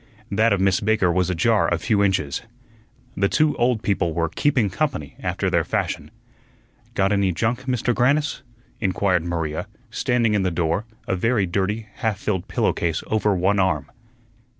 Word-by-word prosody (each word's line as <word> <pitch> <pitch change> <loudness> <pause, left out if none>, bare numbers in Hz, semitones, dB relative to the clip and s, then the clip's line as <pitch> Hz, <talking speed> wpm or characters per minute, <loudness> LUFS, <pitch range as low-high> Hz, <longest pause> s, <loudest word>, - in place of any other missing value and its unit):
That 110 +3 +3
of 100 - +2
Miss 95 -1 +3
Baker 105 -4 +2
was 90 +1 +1
ajar 100 +5 +2
a 85 - +2
few 100 +4 +1
inches. 90 -8 0 0.7
The 100 0 +1
two 155 -1 +2
old 120 -2 +1
people 85 -5 0
were 85 -1 0
"keeping 130 - +1
company" 130 - -2
after - - -2
their - - +2
fashion. - - -2 0.9
"Got 95 0 +2
any 100 -2 +2
junk, 120 +8 -1
Mister 125 -1 +1
Grannis?" 145 +6 +1 0.4
inquired 95 -3 +1
Maria, 85 +1 -3 0.2
standing 120 -3 +1
in 105 - +2
the 95 - +1
door, 85 +4 -1 0.2
a - - +1
very 110 +2 +1
dirty, 100 +5 -1
half 110 -5 -1
filled 95 -3 -2
pillowcase 85 -2 0
over 105 -2 +2
one 95 +3 +2
arm. 75 -7 0
100 Hz, 160 wpm, -23 LUFS, 90-115 Hz, 0.9 s, That